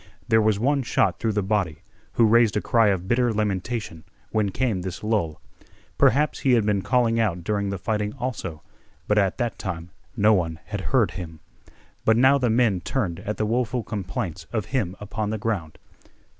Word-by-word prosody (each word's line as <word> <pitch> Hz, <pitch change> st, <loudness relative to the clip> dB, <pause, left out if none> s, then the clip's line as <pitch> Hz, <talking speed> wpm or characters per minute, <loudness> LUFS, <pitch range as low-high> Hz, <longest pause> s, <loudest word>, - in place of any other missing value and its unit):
There 110 Hz, -2 st, +4 dB
was 105 Hz, -1 st, +2 dB
one 140 Hz, +4 st, +2 dB
shot 120 Hz, -, +1 dB
through 110 Hz, -2 st, 0 dB
the 105 Hz, -1 st, 0 dB
body, 95 Hz, -5 st, -1 dB, 0.3 s
who 115 Hz, -, +4 dB
raised 115 Hz, -1 st, +4 dB
a -, -, +3 dB
cry 115 Hz, 0 st, +3 dB
of 95 Hz, -2 st, 0 dB
bitter 120 Hz, +2 st, +2 dB
lamentation 105 Hz, -4 st, -2 dB, 0.3 s
when 105 Hz, -2 st, +1 dB
came 110 Hz, -2 st, -1 dB
this 95 Hz, +1 st, -6 dB
lull. 105 Hz, -8 st, -1 dB, 0.6 s
Perhaps 150 Hz, +2 st, +3 dB
he 130 Hz, -3 st, +2 dB
had 115 Hz, -4 st, +3 dB
been 105 Hz, -2 st, +1 dB
calling 115 Hz, 0 st, +2 dB
out 90 Hz, -6 st, 0 dB
during 100 Hz, +1 st, -1 dB
the 100 Hz, -, -3 dB
fighting 105 Hz, +2 st, -2 dB
also, 100 Hz, -11 st, -4 dB, 0.4 s
but 105 Hz, 0 st, +3 dB
at 95 Hz, -2 st, +1 dB
that 120 Hz, -3 st, -2 dB
time 85 Hz, -2 st, -5 dB, 0.3 s
no 105 Hz, +1 st, +5 dB
one 85 Hz, -5 st, 0 dB
had -, -, -4 dB
heard -, -, +2 dB
him. 80 Hz, -3 st, -8 dB, 0.6 s
But 110 Hz, 0 st, +4 dB
now 135 Hz, +3 st, +5 dB
the 125 Hz, -2 st, +1 dB
men 110 Hz, -5 st, +2 dB
turned 90 Hz, -6 st, -2 dB
at 105 Hz, +3 st, -4 dB
the 110 Hz, -, 0 dB
woeful 120 Hz, +2 st, 0 dB
complaints 95 Hz, -4 st, -4 dB
of 110 Hz, -5 st, -1 dB
him 100 Hz, -9 st, 0 dB
upon 105 Hz, +1 st, -3 dB
the 110 Hz, -, -2 dB
ground. 100 Hz, -8 st, -3 dB
105 Hz, 185 wpm, -24 LUFS, 95-115 Hz, 0.6 s, no